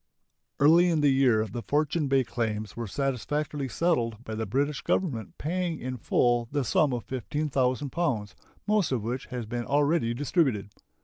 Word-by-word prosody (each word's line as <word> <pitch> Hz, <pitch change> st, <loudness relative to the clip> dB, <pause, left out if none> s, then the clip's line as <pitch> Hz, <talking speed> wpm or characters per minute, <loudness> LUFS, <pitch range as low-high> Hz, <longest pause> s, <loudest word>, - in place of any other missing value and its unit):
Early 165 Hz, +5 st, +6 dB
in 160 Hz, -3 st, +2 dB
the 145 Hz, -1 st, +4 dB
year 125 Hz, -5 st, +3 dB
the 110 Hz, +3 st, -6 dB
Fortune 150 Hz, +3 st, 0 dB
Bay 135 Hz, -1 st, +3 dB
claims 110 Hz, -3 st, -3 dB
were 115 Hz, -1 st, -4 dB
satisfactorily 140 Hz, +4 st, -2 dB
settled 120 Hz, -9 st, 0 dB
by 110 Hz, -, -6 dB
the 110 Hz, 0 st, -3 dB
British 140 Hz, +6 st, 0 dB
Government 125 Hz, -, -1 dB
paying 175 Hz, +1 st, -2 dB
in 130 Hz, 0 st, -4 dB
full 120 Hz, 0 st, +2 dB
the 145 Hz, -1 st, 0 dB
sum 140 Hz, +4 st, +2 dB
of 120 Hz, -3 st, -2 dB
15,000 130 Hz, +1 st, -1 dB
pounds, 120 Hz, -, -1 dB, 0.3 s
most 210 Hz, -6 st, +2 dB
of 120 Hz, -5 st, 0 dB
which 125 Hz, +4 st, -3 dB
has 125 Hz, -3 st, -5 dB
been 120 Hz, +2 st, -3 dB
already 145 Hz, -4 st, +2 dB
distributed. 130 Hz, -, 0 dB
130 Hz, 165 wpm, -27 LUFS, 115-150 Hz, 0.3 s, Early